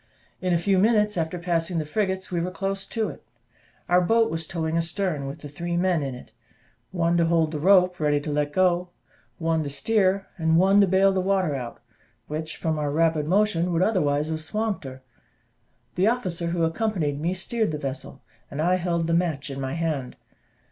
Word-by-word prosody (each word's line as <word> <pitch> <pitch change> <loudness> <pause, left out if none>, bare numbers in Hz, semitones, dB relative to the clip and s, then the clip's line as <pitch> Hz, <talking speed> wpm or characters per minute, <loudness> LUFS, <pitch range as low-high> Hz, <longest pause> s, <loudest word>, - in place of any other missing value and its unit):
In 185 -1 0
a 170 - +4
few 190 +2 +2
minutes 210 0 +3
after 165 0 -2
passing 170 0 -1
the 155 - -1
frigates 190 +3 -2
we 175 -2 0
were 180 - -2
close 195 +1 -3
to 225 -2 -2
it; - - -11 0.6
our 180 +1 +4
boat 225 +5 +3
was 165 0 -2
towing 160 -1 -2
astern, 165 -3 -1
with 145 +3 -8
three 170 +1 -2
men 180 -2 +2
in 135 -2 -3
it 125 - -13 0.6
one 170 -2 +1
to 170 - +3
hold 165 -2 +2
the 155 - -3
rope 180 +1 +4
ready 150 -1 +2
to 150 - -4
let 145 0 0
go, 180 +1 +2 0.5
one 165 -1 0
to 145 - -3
steer, 195 +4 +1
and 160 0 +3
one 195 +3 +5
to 200 - +4
bale 190 +1 +4
the 190 -1 0
water 190 -4 +1
out, 120 -3 -6 0.4
which, 155 +3 -5
from 160 -2 -1
our 145 -1 -1
rapid 160 0 +1
motion, 180 -2 +2
would 170 +1 +2
otherwise 150 -8 +1
have 160 0 -3
swamped 210 +1 -2
her. 130 0 -9 0.9
The 185 +3 +2
officer 185 -8 -1
who 170 0 0
accompanied 165 -5 -1
me 175 +3 0
steered 220 +4 -1
the 150 - -3
vessel, 140 -2 -6 0.3
and 140 - -7
I 180 +4 +3
held 170 -2 -1
the 165 - 0
match 160 -6 0
in 135 0 -5
my 130 0 -3
hand. 155 -6 -2
170 Hz, 195 wpm, -25 LUFS, 155-190 Hz, 0.9 s, one